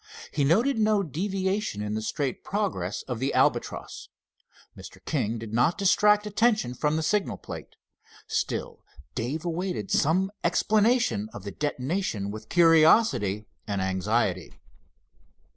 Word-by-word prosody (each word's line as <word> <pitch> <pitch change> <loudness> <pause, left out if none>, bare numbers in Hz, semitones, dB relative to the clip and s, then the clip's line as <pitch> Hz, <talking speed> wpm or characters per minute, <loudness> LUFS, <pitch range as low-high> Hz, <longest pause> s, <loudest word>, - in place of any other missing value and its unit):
He 145 - 0
noted 225 - +3
no 215 -2 +3
deviation 190 - -2
in 105 0 -3
the 110 - -2
straight 135 +3 -3
progress 145 - -2
of 125 -3 -5
the 135 +2 -1
Albatross. - - 0 0.7
Mr. - - -11
King 110 +3 -1
did 110 -1 -8
not 125 +9 +2
distract 210 +1 +4
attention 210 - +1
from 150 +4 0
the 160 - -1
signal 205 +4 0
plate. - - -9 0.5
Still - - -3 0.3
Dave 135 +8 -3
awaited 180 +3 -3
some 185 +6 +2
explanation 215 - +2
of 100 - -8
the 100 - -6
detonation 135 - -2
with 110 +1 -9
curiosity 160 - +4 0.2
and 100 -2 -2
anxiety. 95 - -1
155 Hz, 125 wpm, -26 LUFS, -, 0.7 s, distract